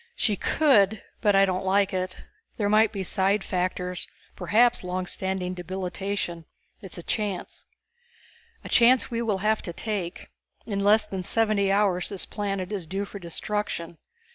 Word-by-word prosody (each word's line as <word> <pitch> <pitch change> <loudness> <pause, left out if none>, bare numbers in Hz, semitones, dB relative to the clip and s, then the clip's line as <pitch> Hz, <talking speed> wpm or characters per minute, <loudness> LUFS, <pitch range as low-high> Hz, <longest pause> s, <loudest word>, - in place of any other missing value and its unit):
"She 215 - +1
could 220 -7 +3 0.2
but 205 -3 +3
I 195 0 +6
don't 185 -1 -1
like 195 +1 +2
it. 185 0 -2 0.4
There 205 -2 0
might 215 +1 +4
be 195 -3 -3
side 195 +2 +1
factors, 180 -1 -2 0.3
perhaps 230 +6 +3
long 180 0 -2
standing 190 0 -2
debilitation. 185 -1 -4 0.4
It's 190 -4 -8
a 175 - -7
chance." 205 -3 -3 1.0
"A - - -8
chance 245 +1 +5
we 230 0 -1
will 215 -4 0
have 220 0 +2
to 170 - -6
take. 200 -3 -4 0.3
In 200 -3 -2
less 210 +1 +5
than 195 -3 -4
seventy 210 -1 +2
hours 195 -3 +2
this 195 -3 -4
planet 195 -2 -3
is 190 -6 -4
due 195 +4 -2
for 200 - -9
destruction. 170 -1 -3
195 Hz, 155 wpm, -26 LUFS, 185-210 Hz, 1.0 s, I